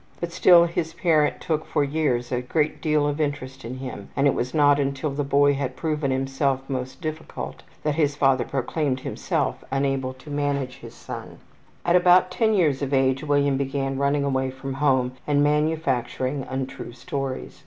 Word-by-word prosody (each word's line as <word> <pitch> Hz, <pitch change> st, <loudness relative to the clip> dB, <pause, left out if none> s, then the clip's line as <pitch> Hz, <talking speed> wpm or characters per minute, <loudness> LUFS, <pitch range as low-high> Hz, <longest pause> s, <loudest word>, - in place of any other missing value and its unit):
But 170 Hz, 0 st, -3 dB
still 170 Hz, 0 st, +6 dB
his 165 Hz, -1 st, -3 dB
parent 160 Hz, -4 st, +2 dB
took 160 Hz, -3 st, -1 dB
for 150 Hz, -, 0 dB
years 140 Hz, -5 st, 0 dB
a 125 Hz, -1 st, 0 dB
great 150 Hz, +3 st, -1 dB
deal 150 Hz, -2 st, +2 dB
of 145 Hz, +1 st, -1 dB
interest 135 Hz, -3 st, -3 dB
in 125 Hz, +3 st, -6 dB
him 125 Hz, -6 st, -7 dB
and 140 Hz, -, +2 dB
it 140 Hz, -, +4 dB
was 125 Hz, +1 st, -2 dB
not 145 Hz, -2 st, +4 dB
until 140 Hz, +1 st, -1 dB
the 145 Hz, +1 st, -2 dB
boy 145 Hz, +1 st, +4 dB
had 135 Hz, -2 st, -3 dB
proven 150 Hz, 0 st, -1 dB
himself 135 Hz, 0 st, 0 dB
most 130 Hz, +2 st, -4 dB
difficult 155 Hz, -1 st, -6 dB, 0.2 s
that 150 Hz, -, +1 dB
his 145 Hz, -2 st, +1 dB
father 135 Hz, -3 st, +3 dB
proclaimed 135 Hz, 0 st, -2 dB
himself -, -, -2 dB
unable 135 Hz, -1 st, -1 dB
to 135 Hz, +3 st, -12 dB
manage 140 Hz, -3 st, -1 dB
his -, -, -12 dB
son. -, -, -8 dB, 0.5 s
At 175 Hz, 0 st, +3 dB
about 180 Hz, 0 st, +5 dB
10 220 Hz, +2 st, +2 dB
years 150 Hz, -8 st, +2 dB
of 140 Hz, 0 st, 0 dB
age 135 Hz, +1 st, +2 dB
William 145 Hz, -2 st, +2 dB
began 135 Hz, 0 st, -2 dB
running 140 Hz, +1 st, +1 dB
away 130 Hz, -1 st, 0 dB
from 135 Hz, +1 st, -6 dB
home 130 Hz, -3 st, +3 dB, 0.2 s
and 145 Hz, -1 st, +3 dB
manufacturing 145 Hz, -3 st, 0 dB
untrue 130 Hz, -2 st, -5 dB
stories. 130 Hz, +1 st, -5 dB
140 Hz, 175 wpm, -24 LUFS, 130-150 Hz, 0.5 s, still